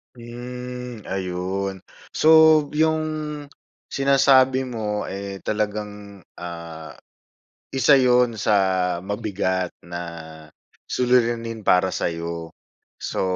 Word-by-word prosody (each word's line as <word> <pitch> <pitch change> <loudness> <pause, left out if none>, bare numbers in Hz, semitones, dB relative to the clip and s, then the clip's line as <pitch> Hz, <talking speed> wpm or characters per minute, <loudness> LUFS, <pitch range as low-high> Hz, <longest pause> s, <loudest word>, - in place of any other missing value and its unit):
Hmm 125 0 -8
ayun. 95 +1 -3 0.3
So, - - +1 0.4
'yung 160 +1 +2 0.9
sinasabi 135 -1 +4
mo, 110 -5 -3
eh, 100 0 -6
talagang, 105 -2 -4 0.2
ah, 85 -2 -8 0.8
isa 135 +2 +4
'yun 125 -2 +4
sa 110 0 0 0.5
mabigat 95 -2 -2 0.2
na 85 0 -6 0.9
suliranin 120 -2 +1
para 95 -1 +3
sa'yo. 85 0 -3 0.5
So, - - -3
105 Hz, 80 wpm, -23 LUFS, 95-125 Hz, 0.9 s, sinasabi